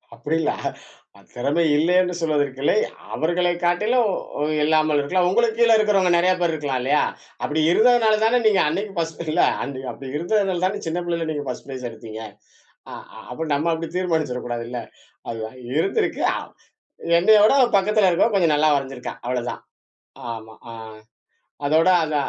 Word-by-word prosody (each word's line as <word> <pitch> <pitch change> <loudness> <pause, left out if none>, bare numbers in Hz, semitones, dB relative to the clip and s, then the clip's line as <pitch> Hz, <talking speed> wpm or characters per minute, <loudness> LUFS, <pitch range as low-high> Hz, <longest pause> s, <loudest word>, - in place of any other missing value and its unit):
அப்பிடி 145 +7 -3
இல்ல. - - +1 0.8
தெறமை 140 +7 0
இல்லேன்னு 180 +4 +2
சொல்வதற்கில்லை. 145 -3 0 0.4
அவர்களை 175 +2 0
காட்டிலும் 210 +7 +2 0.5
இல்லாமல் 155 -1 +2
இருக்கலாம். 180 +5 +1
உங்களுக்கு 225 +3 +1
கீழ 235 -1 +5
இருக்குறவங்க 200 -4 +2
நெறைய 180 +2 +3
பேர் 175 -2 +1
இருக்கலாம் 145 -4 -2
இல்லையா? 140 +4 +2 0.4
அப்பிடி 155 +1 -1
இருந்ததுனால 220 0 +4
தான 235 +3 +3
நீங்க 210 -3 +4
அன்னைக்கி 195 +6 -3
1ஸ்ட் 165 0 -3
இல்ல - - +2 0.2
அன் 140 - -4 0.2
அப்புடி 130 +3 -9
இருந்ததுனால 185 +1 0
தானே 205 +2 -2
சின்ன 170 +2 -2
பிள்ளைல 165 -4 -2
1ஸ்ட் 125 - -6
ஃபிரைஸ் 130 -2 -6
எடுத்தீங்க. 110 -1 -9 0.7
ஆ, - - -8 0.3
அப்ப 160 0 -5
நம்ம 150 +4 0
அப்புடி 165 0 -3
தீர்மானிச்சுட 160 -9 -1
கூடாதுல்ல. 120 0 -4 0.5
அதுவா 110 -1 -5 0.3
இருந்திருக்கு, 195 - 0
அவ் - - -7 0.7
என்னையவுட 210 +5 +5 0.2
பக்கத்துல 205 0 +3
இருக்கவ 175 +6 +2
கொஞ்சம் 170 -6 +3
நல்லா 155 +1 +3
வரைஞ்சிருக்கா. 135 -2 -5
அவ்ளோதான். 125 -1 -3 0.7
ஆமா, 110 -1 -10 0.2
ஆ. - - -8 0.9
அதோட 160 +5 +3
அத 155 -1 -2
165 Hz, 140 wpm, -22 LUFS, 140-190 Hz, 0.9 s, கீழ